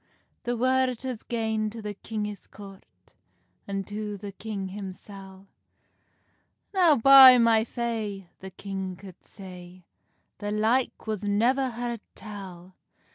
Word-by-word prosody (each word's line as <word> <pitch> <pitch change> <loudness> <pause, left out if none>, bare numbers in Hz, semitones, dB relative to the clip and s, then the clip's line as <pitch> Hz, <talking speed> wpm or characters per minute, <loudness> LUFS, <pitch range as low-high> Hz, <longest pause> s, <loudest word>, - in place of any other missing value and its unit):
The 240 0 -1
word 255 0 +1
has 255 -4 -4
gane 220 -2 -2
to 225 +2 -9
the 210 -1 -5
kingis 210 0 -6
court, 195 -2 -12 0.8
An 195 -1 -3
to 210 0 -5
the 200 0 -8
king 200 -1 -6
himsel; 195 0 -10 1.3
"Now, 355 -6 +5
by 265 0 +9
my 230 -2 +4
fay," 220 -5 -4
the 190 - -8
king 190 0 -6
could 185 -1 -14
say, 180 -2 -12 0.5
"The 205 0 -4
like 225 +5 0
was 215 -2 -3
never 240 +6 +2
heard 235 -1 -4
tell!" 190 -4 -10
210 Hz, 125 wpm, -26 LUFS, 195-235 Hz, 1.3 s, by